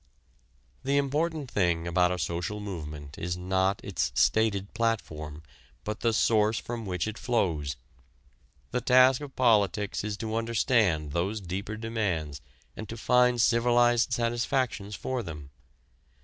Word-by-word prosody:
The 140 +1 +1
important 145 0 -1
thing 85 -4 +1
about 90 +1 +2
a 90 - -1
social 85 +5 -3
movement 75 -8 -7
is 90 +1 -3
not 95 +2 0
its - - -1
stated 100 - +2
platform 80 -10 -2 0.4
but 105 0 -4
the 115 - +2
source 110 0 +3
from 115 -3 -5
which 90 +1 -2
it 110 +1 -5
flows. 85 - 0 1.0
The 125 - -1
task 130 +1 +5
of 145 -2 -8
politics 105 -5 +2
is 105 0 -3
to 110 0 -3
understand 110 - +1
those 95 +7 -1
deeper 100 +3 -5
demands 95 -10 -2 0.3
and 110 -2 -8
to 115 - -6
find 125 +1 +3
civilized 120 +1 +3
satisfactions 115 -2 -1
for 130 -1 -3
them. 75 -7 -8
105 Hz, 135 wpm, -28 LUFS, 90-120 Hz, 1.0 s, task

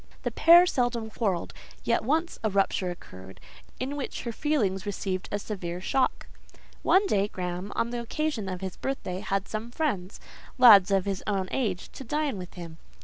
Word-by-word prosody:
The - - -1
pair 345 +2 +7
seldom 240 -7 -1
quarrelled; 195 -7 -1 0.3
yet 230 - +1
once 320 +8 0
a 220 - +2
rupture 195 -2 +1
occurred, 95 - -10 0.4
in 265 +3 -3
which 280 -3 -5
her 235 - -3
feelings 215 -9 0
received 190 -2 -3
a 205 - 0
severe 185 -4 -5
shock. 260 +8 0 0.6
One 390 +2 +4
day 200 - +2
Graham, 180 0 -5
on 235 - 0
the 240 -1 -3
occasion 235 -4 -2
of 185 0 -5
his 190 -2 -5
birthday, 185 -9 -3
had 195 0 -2
some 220 +2 -4
friends—lads 220 - +3
of 195 -2 +2
his 195 -2 -3
own 195 -3 -1
age—to 215 0 -3
dine 290 -3 -1
with 180 -1 -9
him. 165 -2 -9
205 Hz, 165 wpm, -27 LUFS, 185-255 Hz, 0.6 s, pair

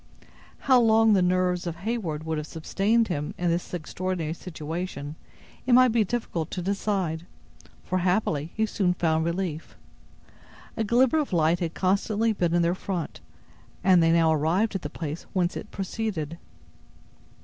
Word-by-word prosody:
How 260 -2 +5
long 225 -1 +5
the 195 - +4
nerves 180 0 +1
of 170 - -3
Heyward 175 -5 -3
would 160 -1 -1
have 150 - -6
sustained 205 +9 +1
him 150 -5 -3
in 175 -1 +1
this 170 +1 -2
extraordinary 175 -1 -3
situation, 160 -3 -5 0.5
it 250 - +4
might 255 0 +7
be 225 -1 +3
difficult 180 -7 -3
to 180 - -4
decide, 190 -4 -1 0.6
for, 185 - -1
happily, 175 -4 0
he 220 - +2
soon 190 -4 0
found 160 -2 +1
relief. 170 -2 -3 1.0
A 225 - 0
glimmer 245 +7 +3
of 295 - -2
light 165 0 +3
had 170 -2 -3
constantly 210 +4 +1
been 175 -4 0
in 175 - +3
their 170 +1 +2
front, 185 -3 -4 0.6
and 185 -2 +6
they 165 0 +4
now 165 -1 +4
arrived 170 +9 +1
at 195 - -2
the 145 - -5
place 155 +1 -6
whence 180 -2 +1
it - - -6
proceeded. 185 -5 -4
180 Hz, 160 wpm, -26 LUFS, 165-210 Hz, 1.0 s, might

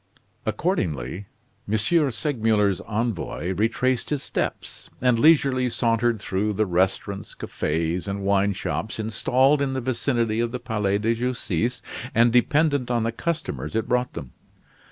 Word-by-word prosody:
Accordingly, 90 - -2 0.4
M. 110 - +3 0.3
Segmuller's 110 - +1
envoy 105 -5 -2
retraced 115 +5 0
his 145 -3 -1
steps, - - -4
and 125 -2 +3
leisurely 135 -4 +4
sauntered 115 -1 +1
through 100 +2 -1
the 110 +2 +1
restaurants, 95 +2 -1
cafes, 80 +4 -2
and 100 0 -3
wine 100 0 +2
shops 110 +3 -3
installed 130 +6 +2
in 135 -1 0
the 130 - -1
vicinity 120 -2 0
of 120 0 0
the 125 - -4
Palais 105 -4 0
de 110 +3 +1
Justice, 125 0 -2 0.3
and 115 +1 +5
dependent 145 +1 +2
on 120 -2 +1
the 115 - 0
customers 110 - -3
it 110 +1 0
brought 125 0 0
them. 70 -7 -7
115 Hz, 135 wpm, -24 LUFS, 100-125 Hz, 0.4 s, and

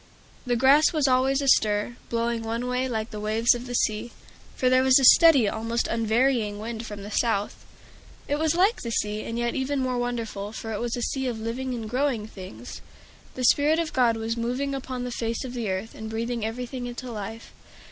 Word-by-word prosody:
The 245 - +2
grass 275 +5 +5
was 300 -3 +2
always 265 +2 +2
astir, 215 -3 +2
blowing 235 0 -1
one 230 +2 -3
way, 250 +1 -1
like 220 -1 -3
the 210 - -6
waves 220 +3 +3
of 240 +1 -6
the 245 - -4
sea; 220 +1 0 0.4
for 255 - 0
there 255 0 +5
was 260 0 +6
a 270 - +2
steady, 280 -4 +7
almost 230 +3 -1
an 230 - -2
unvarying 225 -1 +1
wind 225 +1 -6
from 205 -1 -8
the 205 - -8
south. 210 -3 -1 0.6
It 290 - 0
was 320 0 +1
like 390 +7 +2
the 235 - -4
sea, 210 -1 -1
and 230 +1 -5
yet 240 0 -1
even 270 +1 -1
more 255 -1 -1
wonderful, 225 -4 -4
for 225 0 -5
it 205 - -3
was 235 -1 -2
a 240 - -3
sea 265 +1 -2
of 235 -3 -3
living 245 +3 -3
and 225 -2 -5
growing 250 -2 -1
things. 200 +3 -10 0.5
The 255 - -4
Spirit 295 +5 +4
of 330 -1 -2
God 235 -3 +3
was 225 +1 -2
moving 250 +4 -2
upon 260 -2 -4
the 250 - -4
face 230 0 -3
of 255 -2 -6
the 235 -4 -3
earth, 190 +4 -3
and 220 0 -7
breathing 230 +1 -3
everything 245 +3 -4
into 245 +1 -7
life. 225 +1 -7
235 Hz, 210 wpm, -25 LUFS, 225-260 Hz, 0.6 s, steady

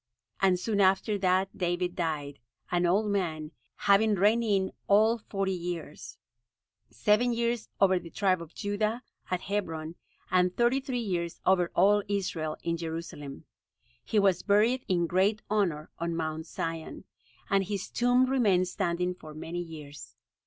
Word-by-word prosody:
And 185 -2 +3
soon 205 +1 0
after 195 +2 +2
that 185 0 +1
David 175 0 -1
died, 150 -5 -3 0.3
an 175 0 +2
old 205 +4 +2
man, 160 -6 -2 0.2
having 205 +2 +3
reigned 210 +5 +3
in 195 -4 +1 0.2
all 220 +3 +4
forty 195 -2 -2
years, 175 -1 -6 0.7
seven 225 +3 +2
years 235 -1 -1
over 190 -2 +4
the 170 - -11
tribe 185 -1 +1
of 170 0 -11
Judah, 215 +4 -1 0.3
at 185 -1 -1
Hebron, 165 -6 -3 0.4
and 180 0 +2
thirty 240 +3 +3
three 260 -2 -4
years 175 -6 -3
over 180 -2 +3
all 205 +3 +5
Israel, 180 -6 -2
in 170 0 -1
Jerusalem. 160 -4 -6 0.6
He 220 - -2
was 195 -4 +3
buried 220 +5 +3
in 175 -2 +2
great 190 +5 +1
honor 175 -8 0
on 170 0 -2
Mount 160 0 -3
Zion, 165 0 -5 0.4
and 195 -1 +2
his 200 0 -3
tomb 245 +1 +3
remained 205 -9 +2
standing 180 +1 -1
for 155 -4 -12
many 165 +3 -5
years. 150 -4 -10
185 Hz, 145 wpm, -29 LUFS, 170-210 Hz, 0.7 s, all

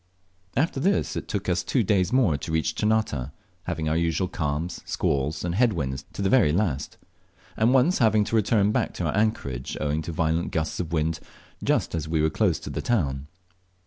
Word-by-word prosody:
After 140 0 +1
this 195 +8 +1
it - - -4
took 100 -2 -3
us 90 -1 +1
two 125 - +1
days 95 -2 +2
more 120 - +3
to 70 +3 -5
reach 80 0 0
Ternate, 105 - 0 0.4
having 80 - -2
our 80 - +1
usual 85 +2 +1
calms, 80 -1 -3
squalls, 70 +5 -1
and 85 - -1
head 115 +3 +3
winds 65 -4 -3
to 100 - -4
the - - +2
very 95 - +5
last; 80 -6 -1 0.6
and 110 +3 +3
once 135 +8 +3
having 110 -2 +4
to 110 - -2
return 105 -1 +3
back - - -1
to - - -2
our - - -1
anchorage 85 - -1
owing 75 +1 0
to 85 - -5
violent 80 +1 0
gusts 80 -1 -2
of 85 -3 -3
wind 80 0 0 0.4
just - - +1
as 80 -2 -2
we 80 -1 +1
were 80 +1 +2
close - - +2
to - - -6
the - - -3
town. 70 - -1
85 Hz, 200 wpm, -25 LUFS, 75-110 Hz, 0.6 s, very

